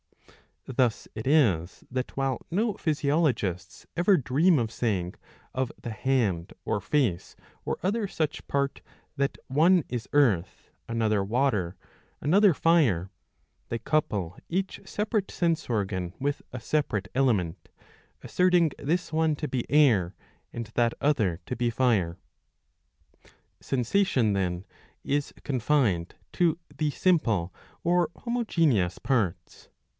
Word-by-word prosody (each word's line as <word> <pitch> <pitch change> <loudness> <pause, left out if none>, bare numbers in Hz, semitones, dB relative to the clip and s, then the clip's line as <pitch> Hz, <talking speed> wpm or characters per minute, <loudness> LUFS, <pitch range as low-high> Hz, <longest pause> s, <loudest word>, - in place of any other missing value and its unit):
Thus 125 -3 0
it 110 - -5
is 100 - +2
that 130 0 -3
while 135 -2 -1
no 210 +5 +1
physiologists 140 - -1
ever 180 +4 +4
dream 155 +5 +3
of 115 -3 -1
saying 95 -8 -1 0.4
of 130 -1 -1
the 120 - -6
hand 110 -8 0
or - - 0
face 110 - 0 0.3
or - - -1
other 205 +3 0
such 155 -5 -3
part 140 -1 -1 0.4
that 140 0 0
one 165 +6 +4
is 120 -3 -4
earth, 105 -11 +2 0.2
another 110 -3 +1
water, 105 -5 0 0.4
another 195 +5 +4
fire, 130 - +2 0.6
they 115 - -1
couple 110 - -1
each 190 +2 -2
separate 210 -1 -1
sense 165 -4 -1
organ 95 -5 -2
with 140 +1 -1
a 130 - -5
separate 110 -8 -1
element, 110 -11 0 0.5
asserting 180 -3 +3
this 170 +5 -1
one 160 -1 +2
to 150 +1 -4
be 130 -3 -3
air 115 - +4 0.4
and 115 -2 -5
that 120 -1 +2
other 110 - +1
to - - -4
be 120 0 0
fire.'^ 115 -9 +1 1.4
Sensation 125 - +1
then 90 -1 -1 0.4
is 145 0 -1
confined 125 - +1 0.2
to 170 -2 +2 0.2
the 155 -1 0
simple 115 - +1 0.3
or 175 0 +2
homogeneous 165 - +1
parts. 95 -10 -2
130 Hz, 120 wpm, -27 LUFS, 100-155 Hz, 1.4 s, ever